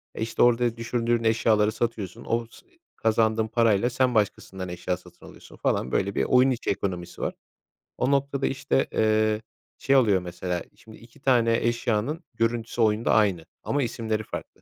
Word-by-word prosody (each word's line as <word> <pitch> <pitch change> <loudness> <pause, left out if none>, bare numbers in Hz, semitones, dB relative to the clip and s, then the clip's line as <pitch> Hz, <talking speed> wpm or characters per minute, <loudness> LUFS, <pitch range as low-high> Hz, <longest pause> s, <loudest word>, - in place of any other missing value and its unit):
E, - - -6
işte, 115 - -2
orada 120 -1 +3
düşürdüğün 120 0 0
eşyaları 110 -1 +3
satıyorsun, 110 -5 -4
o 115 0 0
sı - - -17
ı - - -33 0.3
kazandığın 110 0 +1
parayla 115 0 +2
sen 125 0 +1
başkasından 95 -3 -1
eşya 90 +1 -3
satın 90 0 -17
alıyorsun - - -14
falan. 65 - -1
Böyle 100 +1 0
bir - - +1
oyun 130 +1 +4
içi 125 - -3
ekonomisi 90 -3 -3
var. - - -1 0.6
O 135 - +1
noktada, 140 0 +1
işte, 135 0 0
ııı, 110 0 +2 0.4
şey 135 - +2
oluyor, 105 -8 +4
mesela 90 0 -4
şimdi 110 -1 -15
2 115 0 -18
tane 115 -4 +3
eşyanın 120 +6 -1
görüntüsü 115 +1 -1
oyunda 110 +1 +2
aynı 95 -7 +2 0.2
ama 145 -1 0
isimleri 110 -2 -2
farklı - - -8
115 Hz, 165 wpm, -25 LUFS, 105-120 Hz, 0.6 s, oyun